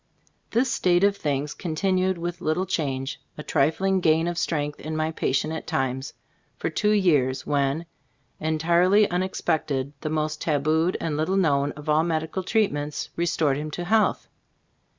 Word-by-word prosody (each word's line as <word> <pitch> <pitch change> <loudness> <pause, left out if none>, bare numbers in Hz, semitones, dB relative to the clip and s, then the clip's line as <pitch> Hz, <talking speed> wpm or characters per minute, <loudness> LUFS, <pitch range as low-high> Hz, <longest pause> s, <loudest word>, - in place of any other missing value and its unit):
This 235 +2 +1
state 180 -5 +2
of 200 0 +4
things 145 -4 -2
continued 185 +2 0
with 175 +1 -4
little 160 +4 0
change 135 -7 -2
— - - -41
a 150 - -6
trifling 190 +9 +1
gain 165 -1 +3
of 175 - -2
strength 150 -4 -2
in 155 +1 -5
my 155 0 0
patient 155 0 0
at 160 - -6
times 130 0 -2 0.2
— - - -41
for - - -2
two 210 - +1
years, 150 -11 +2
when, 140 +3 0 0.5
entirely 170 +6 +3
unexpected, 160 -6 -1
the 155 - -3
most 155 0 -2
tabooed 160 +3 +1
and 160 -3 -2
little 160 +5 0
known 145 -6 +2
of 150 +1 -11
all 155 +1 +3
medical 160 +2 -1
treatments, 165 -8 -1
restored 160 -5 +1
him 150 +1 -4
to 175 +3 -5
health. 215 +3 +2
160 Hz, 160 wpm, -25 LUFS, 150-180 Hz, 0.5 s, of